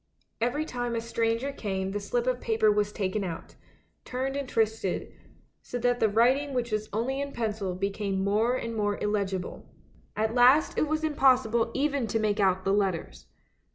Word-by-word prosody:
Every 245 +7 0
time 245 -4 -3
a - - 0
stranger 230 +3 -1
came 190 -7 -3
the 205 - -2
slip 235 +4 -1
of 255 -1 0
paper 220 -2 +3
was 210 0 +1
taken 200 0 -2
out, 170 -3 -6 0.5
turned 260 +2 -3
and 280 -2 -3
twisted, 220 -4 -1 0.5
so 245 - -5
that 245 0 +1
the 220 - +3
writing 260 +6 +2
which 240 -2 -1
was 215 0 -2
only 250 +6 -1
in 280 0 -4
pencil 210 -5 -2
became 195 0 -2
more 215 +5 +2
and 230 -2 -4
more 205 -1 0
illegible. 195 -3 -3 0.5
At 220 +1 0
last 255 +5 +5
it 305 - +1
was 310 +1 -1
impossible 255 -6 +3
even 280 -3 0
to 220 - 0
make 210 -1 0
out 190 -1 +2
the 195 - +2
letters. 165 - -1
225 Hz, 175 wpm, -28 LUFS, 205-250 Hz, 0.5 s, last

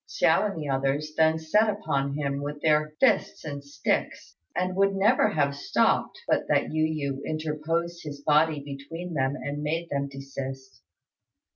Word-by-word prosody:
Hsiao 210 - +3
and 195 - -5
the 150 - -4
others 140 +3 0
then 160 0 +4
set 210 +8 +3
upon 140 -10 -1
him 140 -1 -2
with 145 +1 -5
their 155 -1 +2
fists - - +2
and 140 -2 -5
sticks, 140 0 -2 0.2
and 185 0 -1
would 195 0 +3
never 210 +6 +4
have 140 -2 +1
stopped 140 - +1
but - - +1
that - - +1
Yu 155 0 +2
yü 140 -3 -2
interposed 160 +2 -2
his 145 -2 -7
body 150 +1 +3
between 145 +5 -7
them 135 -1 0
and 145 0 -4
made 165 +3 -2
them 140 0 -1
desist. 135 -1 -7
150 Hz, 160 wpm, -27 LUFS, 140-165 Hz, 0.2 s, then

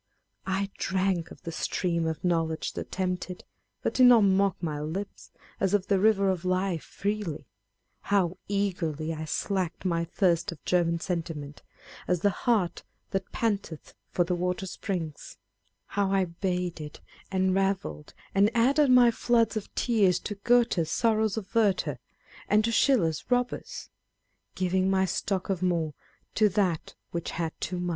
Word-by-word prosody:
I 195 +1 -1
drank 190 -3 0
of - - -14
the 165 - -5
stream 170 0 -1
of 160 -1 -4
knowledge 165 -2 0
that - - -6
tempted, 180 -1 -3 0.4
but - - 0
did 255 -1 +6
not 235 -3 +7
mock 195 -1 +3
my 155 -4 -3
lips, 185 +7 -5 0.3
as 195 +1 +2
of 195 -2 0
the 195 -2 +3
river 200 -2 +4
of 185 -2 -3
life, 185 -2 0
freely. 200 -8 -3 0.6
How 190 -3 +2
eagerly 175 -6 -1
I 160 0 -5
slaked 185 +2 -2
my 170 -2 +1
thirst 170 -1 +1
of 165 - -12
German 170 -2 +2
sentiment, 160 -5 -4 0.5
"as 180 -2 +1
the 205 - +3
hart 205 -4 0 0.3
that 195 -1 -3
panteth 200 -8 -2 0.2
for 175 - +2
the 175 - -1
water 180 +2 -1
springs 175 -5 -5 0.2
;" - - -46
how 200 -1 -1
I 195 -1 +3
bathed 175 -3 -3 0.3
and 190 -1 +2
revelled, 195 -5 -1 0.2
and 200 +2 +4
added 275 +5 +4
my 250 -1 +7
floods 230 -1 +2
of 215 - -4
tears 205 -7 +3
to 210 - -4
Goethe's 230 -5 +2
Sorrows 220 -2 +1
of 200 -3 -6
Werter, 210 -5 +2 0.5
and 215 +1 +4
to 230 - 0
Schiller's 215 - +3
Bobbers 245 0 0
â€" - - -9 0.7
Giving 185 +1 +1
my 190 0 +3
stock 190 +1 -2
of 185 -2 -2
more 170 -4 0 0.4
to 215 -1 +4
that 185 -5 -1 0.2
which 170 -1 -3
had 165 -2 -2
too 180 +1 -2
much 175 0 -2
185 Hz, 155 wpm, -28 LUFS, 170-205 Hz, 0.7 s, not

